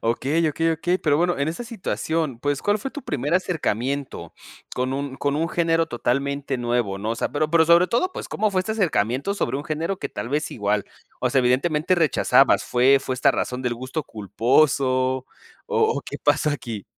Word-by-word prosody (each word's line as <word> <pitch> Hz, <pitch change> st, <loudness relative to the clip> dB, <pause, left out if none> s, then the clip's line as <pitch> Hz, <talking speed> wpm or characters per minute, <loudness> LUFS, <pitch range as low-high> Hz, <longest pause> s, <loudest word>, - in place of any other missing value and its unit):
Okey, 140 Hz, +8 st, +1 dB
okey, 165 Hz, +2 st, 0 dB
okey. 175 Hz, +3 st, 0 dB
Pero, 150 Hz, -5 st, +2 dB
bueno, 175 Hz, +1 st, +1 dB
en 140 Hz, +2 st, 0 dB
esa 170 Hz, +9 st, -4 dB
situación, 165 Hz, -, -3 dB
pues, 145 Hz, +1 st, -2 dB
¿cuál 205 Hz, +1 st, +1 dB
fue 270 Hz, -, -5 dB
tu 290 Hz, -, -8 dB
primer 145 Hz, +3 st, -2 dB
acercamiento 140 Hz, -, -2 dB, 0.4 s
con 130 Hz, +1 st, -1 dB
un 140 Hz, 0 st, -4 dB
con 140 Hz, +1 st, -1 dB
un 165 Hz, +2 st, 0 dB
género 165 Hz, -1 st, +1 dB
totalmente 140 Hz, +1 st, -2 dB
nuevo, 120 Hz, -5 st, -1 dB
no?, 105 Hz, +3 st, -3 dB
o -, -, 0 dB
sea, -, -, -2 dB
pero 150 Hz, +2 st, 0 dB
pero, 165 Hz, 0 st, +5 dB
sobre 170 Hz, +2 st, +5 dB
todo, 365 Hz, +11 st, 0 dB
pues, -, -, -7 dB
¿cómo 215 Hz, 0 st, 0 dB
fue 185 Hz, -2 st, +1 dB
este 200 Hz, +4 st, -3 dB
acercamiento 150 Hz, -, 0 dB
sobre 165 Hz, -, -1 dB
un 145 Hz, -, -5 dB
género 165 Hz, +4 st, -2 dB
que -, -, -4 dB
tal 120 Hz, -, -6 dB
vez 150 Hz, +3 st, -1 dB
igual, 105 Hz, -1 st, -1 dB, 0.4 s
o -, -, +1 dB
sea, 135 Hz, -, +3 dB
evidentemente 150 Hz, +7 st, +2 dB
rechazabas? 160 Hz, -6 st, +4 dB
¿Fue 130 Hz, +3 st, +4 dB
fue 130 Hz, -, -3 dB
esta 135 Hz, +2 st, +3 dB
razón 125 Hz, 0 st, -2 dB
del 125 Hz, -1 st, -1 dB
gusto 130 Hz, +6 st, -4 dB
culposo 120 Hz, -, +1 dB
o 130 Hz, 0 st, 0 dB, 0.7 s
o -, -, -2 dB
qué -, -, -6 dB
pasó 150 Hz, -, +2 dB
aquí? 115 Hz, -8 st, -5 dB
140 Hz, 200 wpm, -23 LUFS, 125-165 Hz, 0.7 s, pero